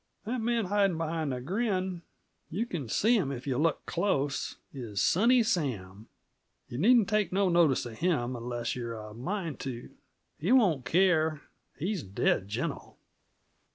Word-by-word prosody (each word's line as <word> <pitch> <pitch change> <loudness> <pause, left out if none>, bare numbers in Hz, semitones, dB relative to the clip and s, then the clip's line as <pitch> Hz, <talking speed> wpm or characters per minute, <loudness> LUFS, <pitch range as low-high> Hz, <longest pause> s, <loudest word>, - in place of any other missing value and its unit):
That 240 +2 -2
man 230 -1 +1
hidin' 195 -2 +2
behind 160 -2 -2
the 125 - -3
grin 185 - -1 0.5
you 205 +8 -1
can 155 - -5
see 225 - +3
him 170 -11 +1
if 125 -2 -6
yuh 130 -2 -1
look 165 +2 +1
close 145 -7 -1 0.2
is 115 -7 -5
Sunny 235 - +4
Sam. 115 - -2 0.6
Yuh 120 - -5
needn't 225 +3 +5
take 210 -3 +1
no 195 0 +2
notice 170 -8 +3
of 115 -2 -8
him, 145 -8 0
unless 120 0 -3
you're 115 -2 -4
a 105 -1 -8
mind 165 - -4
to. 125 -3 -6 0.5
He 180 +9 0
won't 185 - +4
care 160 -1 +3 0.4
he's 185 +3 -2
dead 95 -2 0
gentle. 105 +3 -4
160 Hz, 155 wpm, -29 LUFS, 125-200 Hz, 0.6 s, needn't